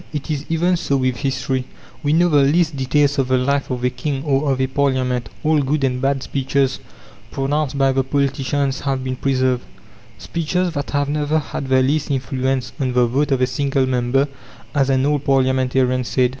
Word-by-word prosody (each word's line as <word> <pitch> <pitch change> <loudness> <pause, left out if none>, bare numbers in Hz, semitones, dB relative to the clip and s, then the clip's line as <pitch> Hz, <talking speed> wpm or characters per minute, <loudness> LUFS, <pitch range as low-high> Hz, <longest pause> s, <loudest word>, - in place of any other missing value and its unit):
It 150 0 -4
is 145 -2 -3
even 175 +2 +2
so 140 -5 0
with 130 -2 0
history. 130 -2 -2 0.4
We 145 - 0
know 170 +3 +4
the 150 -4 +4
least 155 +3 +2
details 140 +2 +1
of 135 - +1
the 130 0 +2
life 140 +2 0
of 125 -2 -3
a 125 - +2
king 135 +2 -3
or 140 -1 +1
of 130 - -1
a 130 - +2
parliament; 130 -2 0
all 155 -1 +3
good 140 +1 0
and 125 -1 0
bad 135 0 0
speeches 135 0 0 0.5
pronounced 140 +1 -1
by 135 -1 +3
the 135 0 +1
politicians 140 0 0
have 135 -2 -2
been 130 0 -2
preserved: 130 -2 +1 0.6
"speeches 170 +2 -2
that 145 -2 -3
have 145 -1 0
never 150 +1 0
had 145 -2 -4
the 130 0 +3
least 150 +4 0
influence 130 -1 -1
on 130 -2 -1
the 125 -1 +4
vote 140 +5 0
of 130 -2 +2
a - - +5
single 135 +1 0
member," 130 +2 +1 0.5
as 140 -2 +2
an 130 0 +2
old 145 -1 +1
parliamentarian 130 -2 +2
said. 125 +1 +1
135 Hz, 195 wpm, -20 LUFS, 130-145 Hz, 0.6 s, a